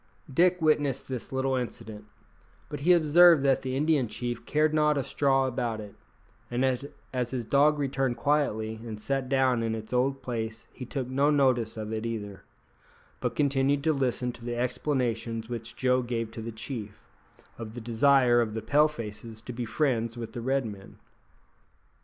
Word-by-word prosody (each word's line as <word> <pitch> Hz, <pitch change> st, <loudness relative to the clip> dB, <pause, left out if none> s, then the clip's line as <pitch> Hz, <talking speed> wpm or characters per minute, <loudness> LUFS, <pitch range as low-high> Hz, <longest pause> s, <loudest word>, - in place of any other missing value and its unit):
Dick 180 Hz, +5 st, +4 dB
witnessed 145 Hz, -4 st, +1 dB
this 130 Hz, -3 st, -5 dB
little 130 Hz, 0 st, 0 dB
incident; 110 Hz, -4 st, -5 dB, 0.6 s
but 145 Hz, -, -5 dB
he 165 Hz, +6 st, +3 dB
observed 170 Hz, -1 st, +6 dB
that 135 Hz, -1 st, +3 dB
the 130 Hz, -1 st, -3 dB
Indian 145 Hz, -3 st, +2 dB
chief 120 Hz, +1 st, -5 dB
cared 155 Hz, +1 st, +2 dB
not 150 Hz, -1 st, +3 dB
a 140 Hz, -, 0 dB
straw 135 Hz, 0 st, +2 dB
about 120 Hz, -3 st, -2 dB
it, 105 Hz, -2 st, -9 dB, 0.6 s
and 120 Hz, +2 st, 0 dB, 0.5 s
as 125 Hz, -2 st, -1 dB
his 125 Hz, -3 st, -3 dB
dog 145 Hz, +5 st, +4 dB
returned 135 Hz, -3 st, -1 dB
quietly 110 Hz, -7 st, 0 dB
and 110 Hz, -3 st, -7 dB
sat 135 Hz, +3 st, -2 dB
down 130 Hz, -3 st, +2 dB
in 115 Hz, -1 st, -1 dB
its 110 Hz, +2 st, -7 dB
old 135 Hz, +2 st, +1 dB
place 115 Hz, -2 st, -4 dB
he 125 Hz, -, -8 dB
took 130 Hz, -3 st, -3 dB
no 140 Hz, +3 st, +2 dB
notice 130 Hz, -6 st, +2 dB
of 110 Hz, 0 st, -4 dB
it 110 Hz, 0 st, -3 dB
either, 105 Hz, -4 st, -5 dB, 0.8 s
but -, -, -2 dB
continued 140 Hz, 0 st, +1 dB
to 160 Hz, 0 st, +3 dB
listen 125 Hz, -3 st, 0 dB
to 120 Hz, -, -14 dB
the 120 Hz, 0 st, -3 dB
explanations 120 Hz, -3 st, -1 dB
which 120 Hz, 0 st, -6 dB
Joe 125 Hz, 0 st, +2 dB
gave 115 Hz, -2 st, -3 dB
to 115 Hz, -, -7 dB
the 115 Hz, +1 st, -5 dB
chief, 110 Hz, -2 st, -7 dB, 0.6 s
of 110 Hz, -1 st, -7 dB
the -, -, -5 dB
desire 120 Hz, +1 st, +4 dB
of 110 Hz, -2 st, -2 dB
the 110 Hz, -, -4 dB
Pale 145 Hz, +7 st, +4 dB
faces 115 Hz, -4 st, -8 dB
to 125 Hz, -, -7 dB
be 120 Hz, 0 st, -4 dB
friends 115 Hz, -3 st, 0 dB
with 115 Hz, -2 st, -6 dB
the 120 Hz, -, -5 dB
Red 135 Hz, +1 st, 0 dB
men. 100 Hz, -3 st, -9 dB
125 Hz, 175 wpm, -28 LUFS, 115-140 Hz, 0.8 s, observed